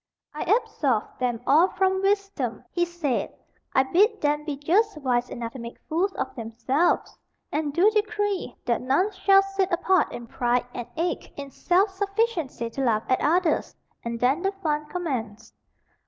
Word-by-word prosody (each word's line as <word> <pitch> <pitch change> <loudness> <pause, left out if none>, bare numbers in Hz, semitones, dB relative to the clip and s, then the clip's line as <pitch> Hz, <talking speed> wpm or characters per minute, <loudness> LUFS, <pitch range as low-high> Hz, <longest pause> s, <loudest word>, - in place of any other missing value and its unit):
"I 300 - -6 0.2
absolve 285 - -1
them 245 -2 -1
all 315 +6 +5
from 380 0 +1
wisdom," 395 0 -1
he 345 -1 +1
said; 340 -7 -2 0.4
"I 265 - +6
bid 410 - +3
them 295 -1 0
be 295 -3 -3
just 380 +7 +2
wise 250 -4 0
enough 230 -1 -5
to 265 - -8
make 235 0 -8
fools 355 +5 +1
of - - -4
themselves, 240 +8 0 0.4
and 300 -1 -1
do 345 +7 +4
decree 415 - -1
that 235 -2 +1
none 275 +11 +2
shall 390 0 +4
sit 390 -1 -1
apart 360 0 +2
in 240 - -7
pride 245 +1 0
and 240 - -5
eke 345 +2 -3
in 280 -1 -7
self 380 +7 +2
sufficiency 395 - -1
to 275 - -4
laugh 225 -4 +2
at 255 - +2
others"; 335 +1 +1 0.3
and 235 0 -4
then 265 +7 +2
the 390 +1 0
fun 300 -1 0
commenced. 235 - -4
310 Hz, 165 wpm, -25 LUFS, 250-385 Hz, 0.4 s, I